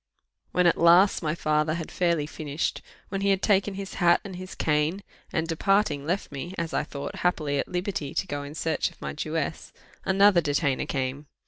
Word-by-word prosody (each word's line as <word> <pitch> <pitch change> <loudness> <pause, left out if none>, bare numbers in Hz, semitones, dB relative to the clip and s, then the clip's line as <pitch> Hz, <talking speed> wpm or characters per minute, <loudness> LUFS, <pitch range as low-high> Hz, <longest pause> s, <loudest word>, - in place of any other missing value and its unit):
When 180 0 +2
at 170 - +4
last 175 +4 +6
my 155 -1 -1
father 155 -1 +1
had 165 -2 -5
fairly 170 -4 +1
finished, 150 0 -3 0.3
when 195 0 -3
he 200 - +2
had 195 -1 +2
taken 200 -1 +2
his 195 0 -6
hat 175 0 +5
and 195 -3 -7
his 185 0 -8
cane, 155 +5 0 0.3
and 160 -1 -1
departing 165 -4 +1
left 180 0 -1
me, 170 +7 -6
as 170 -1 -3
I - - +1
thought, 140 -1 -6
happily 150 -5 0
at - - -1
liberty 180 -6 -3
to - - 0
go 145 -6 -4
in 145 +1 -8
search 160 -1 0
of - - -21
my - - -5
Jewess, 155 0 -3 0.3
another 195 -1 +5
detainer 145 -2 0
came. 135 +1 -3
165 Hz, 195 wpm, -26 LUFS, 150-185 Hz, 0.3 s, last